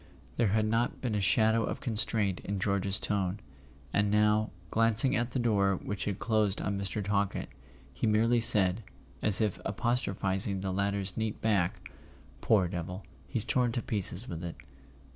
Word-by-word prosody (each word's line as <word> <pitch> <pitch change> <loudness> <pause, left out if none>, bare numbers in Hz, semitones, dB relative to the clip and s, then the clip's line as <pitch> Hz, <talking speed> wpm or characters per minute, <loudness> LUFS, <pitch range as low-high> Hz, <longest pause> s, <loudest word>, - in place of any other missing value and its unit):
There 115 - +2
had 110 +2 +1
not 115 +3 0
been 125 -4 -3
a 105 - 0
shadow 110 +5 +3
of - - -3
constraint 105 -4 0
in 100 +1 -4
George's 100 0 0
tone; 100 -2 -2 0.5
and 100 0 +2
now, 105 +1 +2 0.2
glancing 115 +3 +4
at 120 0 -1
the 125 - -4
door 100 -5 +2
which 100 +2 -5
had 100 -2 -2
closed 110 -4 0
on 100 - -2
Mr. 100 +1 -3
Talkett, 100 0 -1 0.4
he 65 - -2
merely 115 +3 +3
said, 105 -3 +3 0.4
as 105 0 +6
if 105 -4 -1
apostrophizing 100 -5 -1
the 95 -1 -3
latter's 100 -1 -2
neat 110 -1 -2
back: 95 -3 -1 0.5
"Poor 100 -5 +3
devil! 90 +2 -6 0.2
He's 100 +11 -3
torn 125 -2 +1
to 120 - -1
pieces 100 +1 0
with 85 -4 -6
it." 85 -1 -5
105 Hz, 160 wpm, -30 LUFS, 95-110 Hz, 0.5 s, as